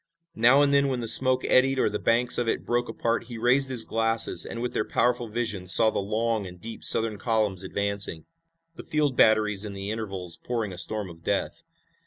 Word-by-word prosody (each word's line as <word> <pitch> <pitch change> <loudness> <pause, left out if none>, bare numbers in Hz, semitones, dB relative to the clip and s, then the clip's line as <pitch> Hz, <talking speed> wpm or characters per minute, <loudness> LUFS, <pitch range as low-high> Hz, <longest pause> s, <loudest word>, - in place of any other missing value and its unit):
Now 130 +3 +3
and 140 0 +1
then 140 0 +2
when 130 -2 -3
the 115 - -5
smoke 130 +2 +5
eddied 135 +1 +2
or - - +1
the 105 0 -4
banks 120 +2 +2
of 120 - -2
it - - -3
broke 120 0 -2
apart 115 0 -3
he 120 -2 -9
raised 125 +4 +1
his 120 -4 -4
glasses 115 0 +1
and 115 - -7
with 120 +1 -4
their - - -1
powerful 120 +1 -1
vision 105 -5 -4
saw 110 +4 +7
the - - -3
long 110 +1 -3
and 90 -1 -13
deep 115 +5 -10
Southern 110 -2 +2
columns 110 -5 -1
advancing, 100 -3 -4 0.5
the - - -10
field 150 -4 -1
batteries 105 -3 +2
in 105 -2 -7
the 100 +1 -6
intervals 95 -6 -4
pouring 115 -5 -5
a - - -11
storm 105 0 +2
of 85 -1 -10
death. - - -3
115 Hz, 210 wpm, -25 LUFS, 100-120 Hz, 0.5 s, saw